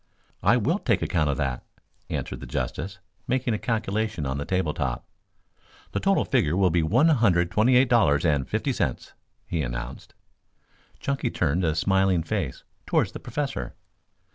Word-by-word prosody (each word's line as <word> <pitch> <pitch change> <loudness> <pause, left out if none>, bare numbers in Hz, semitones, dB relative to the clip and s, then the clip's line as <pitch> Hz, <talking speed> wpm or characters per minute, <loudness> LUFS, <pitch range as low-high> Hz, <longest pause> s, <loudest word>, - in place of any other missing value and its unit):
"I 115 +6 +4
will 155 - +1
take 115 - +1
account 80 -5 +1
of 70 - 0
that," 65 -4 -2 0.5
answered - - -4
the - - -8
justice, 95 +4 -3 0.3
making 125 -1 0
a 105 - -1
calculation 110 - -1
on 65 +1 -2
the 70 - -3
table 90 -5 0
top. 65 -6 -3 0.9
"The - - -1
total - - +2
figure 75 +4 +1
will 95 -3 +3
be 85 0 +2
one 120 - +4
hundred 95 - +3
twenty 110 +7 +4
eight 130 +2 +5
dollars 85 -12 +4
and 75 -5 +1
fifty - - 0
cents," - - -2 0.3
he 85 - -2
announced. - - -6 0.8
Chunky 140 -1 -1
turned 85 0 0
a 80 -2 +1
smiling 95 0 +2
face 80 - -3 0.2
towards - - +2
the - - -7
Professor. 135 - -4
90 Hz, 165 wpm, -25 LUFS, 75-115 Hz, 0.9 s, eight